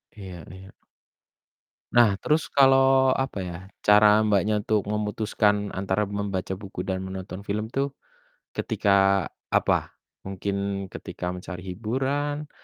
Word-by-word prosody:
Iya 95 Hz, -5 st, -9 dB
iya. 95 Hz, +1 st, -12 dB, 1.2 s
Nah, 115 Hz, -5 st, +5 dB
terus 155 Hz, 0 st, +1 dB
kalo 135 Hz, -1 st, +7 dB, 0.5 s
apa 135 Hz, -, -6 dB
ya, 90 Hz, -1 st, -6 dB, 0.3 s
cara 105 Hz, +1 st, +6 dB
Mbaknya 105 Hz, 0 st, +1 dB
untuk 105 Hz, -2 st, 0 dB
memutuskan 105 Hz, -1 st, 0 dB
antara 95 Hz, +2 st, 0 dB
membaca 100 Hz, -2 st, -3 dB
buku 95 Hz, -2 st, -7 dB
dan 95 Hz, 0 st, -2 dB
menonton 95 Hz, +1 st, -7 dB
film 105 Hz, +2 st, -2 dB
tuh 135 Hz, +3 st, -2 dB, 0.7 s
ketika 100 Hz, -2 st, +2 dB, 0.2 s
apa? -, -, +1 dB, 0.3 s
Mungkin 100 Hz, 0 st, -3 dB
ketika 90 Hz, -, -6 dB
mencari 90 Hz, 0 st, -7 dB
hiburan 140 Hz, +8 st, -2 dB
100 Hz, 115 wpm, -25 LUFS, 95-110 Hz, 1.2 s, kalo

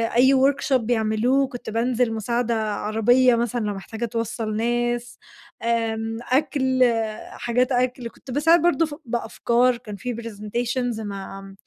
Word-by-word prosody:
أي 260 Hz, +3 st, +6 dB
workshop 275 Hz, +1 st, +2 dB
بيعملوه 235 Hz, +2 st, +2 dB
وكنت 245 Hz, -4 st, -6 dB
بانزِل 235 Hz, +1 st, +1 dB
مساعدة 235 Hz, +2 st, -1 dB, 0.2 s
عربية 240 Hz, +4 st, +3 dB
مثلًا 235 Hz, +1 st, -1 dB
لو 205 Hz, -, -1 dB
محتاجة 220 Hz, +4 st, -5 dB
توصَّل 225 Hz, -1 st, -3 dB
ناس 240 Hz, +1 st, -1 dB, 0.5 s
آمم، 225 Hz, -1 st, -1 dB
أكْل 260 Hz, -2 st, +2 dB, 0.5 s
حاجات 250 Hz, +2 st, 0 dB
أكْل، 250 Hz, -1 st, 0 dB
كنت 255 Hz, -, -12 dB
باساعد 320 Hz, +5 st, +4 dB
برضه 335 Hz, -2 st, +3 dB
ف 295 Hz, -2 st, -7 dB
بأفكار 240 Hz, +1 st, +1 dB
كان 215 Hz, -4 st, -9 dB
في 245 Hz, +3 st, -4 dB
presentations 235 Hz, +2 st, -3 dB
مع 195 Hz, -1 st, -7 dB
240 Hz, 130 wpm, -23 LUFS, 225-255 Hz, 0.5 s, أي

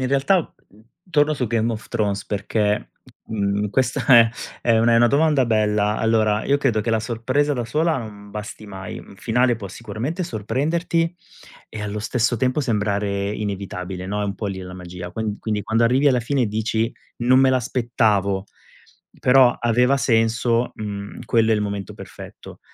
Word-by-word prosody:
in 130 Hz, -, 0 dB
realtà, 140 Hz, +7 st, +1 dB, 0.2 s
mhmm, 105 Hz, +2 st, -21 dB, 0.3 s
torno 150 Hz, -1 st, +3 dB
su 130 Hz, -4 st, -2 dB
Game 115 Hz, +1 st, 0 dB
of 110 Hz, -1 st, -7 dB
Thrones 105 Hz, -3 st, -1 dB
perché, 105 Hz, 0 st, -1 dB, 0.4 s
mhmm, 100 Hz, -1 st, -1 dB
questa 130 Hz, +4 st, 0 dB, 0.2 s
è 115 Hz, -1 st, +3 dB, 0.3 s
è 115 Hz, -1 st, +3 dB
una 115 Hz, +1 st, +4 dB
è 115 Hz, -, +5 dB
una 120 Hz, -, +6 dB
domanda 145 Hz, 0 st, +3 dB
bella. 105 Hz, -1 st, +1 dB
Allora, 110 Hz, -2 st, +2 dB
io 140 Hz, -, +3 dB
credo 120 Hz, -6 st, +1 dB
che, 115 Hz, -, -2 dB
la 110 Hz, -1 st, +1 dB
sorpresa 130 Hz, +6 st, 0 dB
da 125 Hz, -4 st, -2 dB
sola 155 Hz, +6 st, +1 dB
non 105 Hz, -3 st, -9 dB
basti 105 Hz, +1 st, -7 dB
mai, 95 Hz, -2 st, -7 dB
un 100 Hz, -, -14 dB
finale 120 Hz, +3 st, +1 dB
può 100 Hz, -3 st, -7 dB
sicuramente 115 Hz, -, -4 dB
sorprenderti, 165 Hz, -, -1 dB, 0.6 s
e 110 Hz, -, -7 dB
allo 105 Hz, 0 st, -4 dB
stesso 115 Hz, +2 st, 0 dB
tempo 130 Hz, +4 st, +1 dB
sembrare 100 Hz, -4 st, -1 dB
inevitabile, 95 Hz, -3 st, -5 dB
no, 105 Hz, +1 st, -2 dB
è -, -, -1 dB
un 100 Hz, 0 st, -3 dB
po' 105 Hz, -, -4 dB
lì 95 Hz, -1 st, -4 dB
la 90 Hz, -1 st, -8 dB
magia. 90 Hz, -1 st, -8 dB
Quan 105 Hz, +1 st, -3 dB
quindi 105 Hz, -2 st, -2 dB
quando 110 Hz, +3 st, +1 dB
arrivi 130 Hz, +5 st, +3 dB
alla 130 Hz, -3 st, +3 dB
fine 130 Hz, +2 st, 0 dB
e -, -, 0 dB
dici: 110 Hz, +2 st, -1 dB, 0.3 s
"Non 125 Hz, +2 st, +4 dB
me 135 Hz, 0 st, +5 dB
l'aspettavo, 110 Hz, -6 st, +1 dB, 0.7 s
però 125 Hz, -1 st, +6 dB
aveva 125 Hz, +3 st, +3 dB
senso," 115 Hz, 0 st, +1 dB
mhmm, 100 Hz, 0 st, -6 dB
quello 115 Hz, 0 st, +2 dB
è 110 Hz, -, +4 dB
il 105 Hz, -, -1 dB
momento 100 Hz, -2 st, -4 dB
perfetto. -, -, -11 dB
110 Hz, 175 wpm, -22 LUFS, 105-125 Hz, 0.7 s, una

